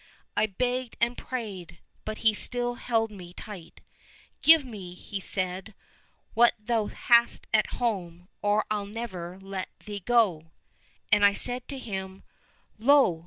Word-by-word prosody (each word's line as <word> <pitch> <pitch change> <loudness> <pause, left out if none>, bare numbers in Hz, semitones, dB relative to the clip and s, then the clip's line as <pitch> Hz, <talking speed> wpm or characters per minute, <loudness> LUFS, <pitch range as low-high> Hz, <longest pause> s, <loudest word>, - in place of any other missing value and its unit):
I 215 - +3
begged 250 +4 -2
and 240 +1 +2
prayed, 205 -12 -6 0.3
but 215 0 -4
still 245 +2 +3
he 240 - -13
held 225 -2 +1
me 180 -4 -11
tight. 185 -5 -10 0.3
' - - -28
Give 320 -2 +7
me,' 195 -7 -8 0.2
said 185 0 -3
he, 215 - -17 0.3
' - - -40
what 240 +1 +5
thou 220 0 -1
hast 235 0 +3
at 215 -1 +2
home, 180 -7 -2
or 205 +1 +2
I'll 205 -1 -1
never 190 -5 -6
let 195 -1 -5 0.2
thee 205 -1 -5
go! 195 -9 +2 0.2
' - - -39
— - - -6
^And 210 0 +5
I 200 0 +7
said 245 +4 0
to 275 - -5
him, 190 -5 -6 0.3
' - - -38
Lo 255 - +5
215 Hz, 165 wpm, -27 LUFS, 190-240 Hz, 0.3 s, Give